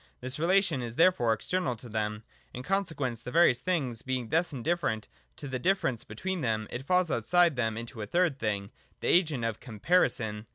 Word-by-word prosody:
This 130 +3 -4
relation 175 -4 +2
is 120 -1 -6
therefore 165 -9 +4
external 130 +5 -1
to 120 +2 -11
them. 105 -1 -3 0.3
In 125 - -6
consequence 150 - -1
of - - -14
the - - -4
various 165 -7 +5
things 135 -11 -1
being 130 -3 -3
thus 165 +2 +1
indifferent 135 -4 -1 0.3
to 145 - -8
the 130 -1 -3
difference 135 - 0
between 185 - -4
them, 110 -4 0
it 130 +3 -6
falls 180 -3 +2
outside 170 +7 +3
them 110 -3 -1
into 115 -1 -7
a 105 - -4
third 170 - +1
thing, 100 -1 -2 0.3
the - - 0
agent 155 -9 +3
of 115 -2 -2
Comparison. 110 - 0
130 Hz, 190 wpm, -29 LUFS, 115-175 Hz, 0.3 s, various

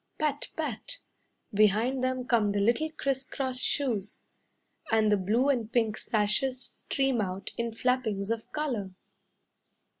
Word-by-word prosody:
Pat! 295 -2 -1
Pat! 310 - -3 0.6
behind 215 +6 +3
them 255 -1 0
come 220 -5 +3
the 205 - +1
little 235 +10 +2
criss 275 -3 -1
cross 260 -2 -3
shoes, 225 -8 -1 0.7
And 220 -1 +4
the - - +6
blue 215 +7 +2
and 235 -5 +1
pink 225 -3 +2
sashes 220 +6 +1
stream 270 -2 -1
out 190 -1 -3
in 235 0 -2
flappings 225 -4 0
of 225 -1 -3
colour. 235 -12 -2
235 Hz, 130 wpm, -29 LUFS, 210-265 Hz, 0.7 s, the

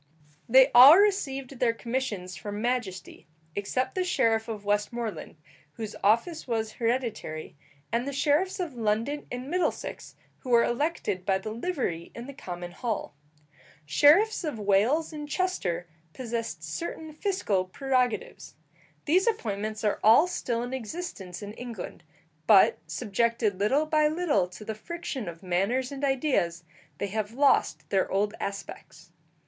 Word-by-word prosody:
They 260 +3 +7
all 265 +7 +10
received 275 -11 +1
their 235 -2 +3
commissions 225 -8 -3
from 205 +3 -6
majesty, 225 -6 -3 0.3
except 255 +6 -1
the 370 - 0
sheriff 230 -10 +1
of 215 -3 -6
Westmoreland, 210 +2 -2 0.4
whose 220 -2 -6
office 235 - +2
was 220 -2 -1
hereditary, 230 -10 -3 0.4
and 235 +4 0
the - - -2
sheriffs 300 +8 +1
of 345 -6 -3
London 230 +5 -1
and 250 +1 -5
Middlesex, 355 +4 -2 0.2
who 255 - -9
were 235 -1 +5
elected 240 - -1
by 190 0 +2
the 215 +3 -6
livery 230 - -3
in 235 - -7
the 280 - -8
common 175 -8 -7
hall. 220 - -3 0.7
Sheriffs 330 - +5
of 300 -8 -3
Wales 215 +11 +2
and 295 -1 -6
Chester 185 - -1 0.3
possessed 230 -10 -4
certain 315 - -5
fiscal 300 - 0
prerogatives. 260 - -1 0.5
These 365 +8 +3
appointments 215 - -2
are 210 - +1
all 225 +9 +7
still 240 -10 -2
in 245 +1 -5
existence 225 - -6
in 205 +1 -7
England, 235 -5 -7 0.5
but, 200 -3 +6
subjected 230 -2 0
little 265 +10 +2
by 305 -1 +3
little 305 - +1
to 185 +4 -11
the 220 - -3
friction 265 - -5
of 170 +2 -11
manners 200 +9 0
and 280 0 -7
ideas, 260 - +1 0.3
they 200 - -3
have 215 +1 -3
lost 280 +2 +2
their 195 -2 +2
old 205 +2 +1
aspects. 175 -4 -7
235 Hz, 140 wpm, -27 LUFS, 205-285 Hz, 0.7 s, all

